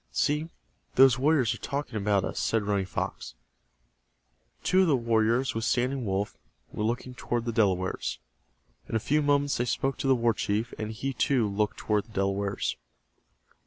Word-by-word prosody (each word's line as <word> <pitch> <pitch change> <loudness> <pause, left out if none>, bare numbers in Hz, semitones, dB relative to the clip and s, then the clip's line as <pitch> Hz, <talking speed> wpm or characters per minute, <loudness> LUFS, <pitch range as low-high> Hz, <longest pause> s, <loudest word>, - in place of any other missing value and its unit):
"See, 150 - 0 0.5
those 130 -2 +6
warriors 135 -5 +3
are 115 - -9
talking 140 -4 -4
about 100 -2 +1
us," - - -4
said 115 -2 +1
Running 100 -2 0
Fox. - - -4 1.3
Two 185 +1 +4
of 185 - +3
the 150 - +4
warriors 115 +1 +1
with 115 - -3
Standing 125 0 0
Wolf 100 +1 -1 0.4
were 105 - -3
looking 120 +3 -2
toward 120 -1 -2
the 120 - -1
Delawares. 95 -5 0 0.7
In - - -3
a - - +3
few 150 +7 +1
moments 145 -1 +2
they 120 - 0
spoke 135 +2 -1
to 135 - -1
the 135 - +5
war 115 -1 +2
chief, 105 +3 -2
and 110 0 -3
he, 130 +5 -3
too, 125 -3 +2
looked 105 +1 -1
toward 105 -1 0
the 110 - -18
Delawares. 100 - -1
115 Hz, 170 wpm, -28 LUFS, 105-135 Hz, 1.3 s, those